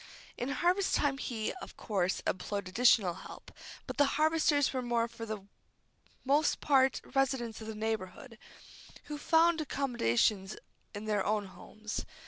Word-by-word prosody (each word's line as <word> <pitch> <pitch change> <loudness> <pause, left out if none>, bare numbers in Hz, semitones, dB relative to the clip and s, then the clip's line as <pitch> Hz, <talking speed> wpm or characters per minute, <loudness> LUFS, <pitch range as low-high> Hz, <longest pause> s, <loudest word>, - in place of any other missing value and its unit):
In 245 - -3
harvest 360 +7 +1
time 275 -2 +1
he, 225 -6 -3
of - - -10
course, 190 -4 -1
employed 200 +1 -2
additional 200 -2 +4
help, - - -11 0.3
but - - -6
the 285 -2 +5
harvesters 310 -2 +3
were 240 -2 0
for 230 -1 -8
the 215 -3 -5 0.8
most 290 +3 +2
part 265 -2 +3
residents 260 -5 0
of 220 - -7
the 220 - -5
neighborhood, 220 +1 -4 0.6
who 295 -1 -6
found 325 +1 +4
accommodation 215 - +1 0.5
in 205 +1 -6
their 210 -2 +1
own 210 -1 0
homes. 215 +3 -7
235 Hz, 135 wpm, -32 LUFS, 210-280 Hz, 0.8 s, the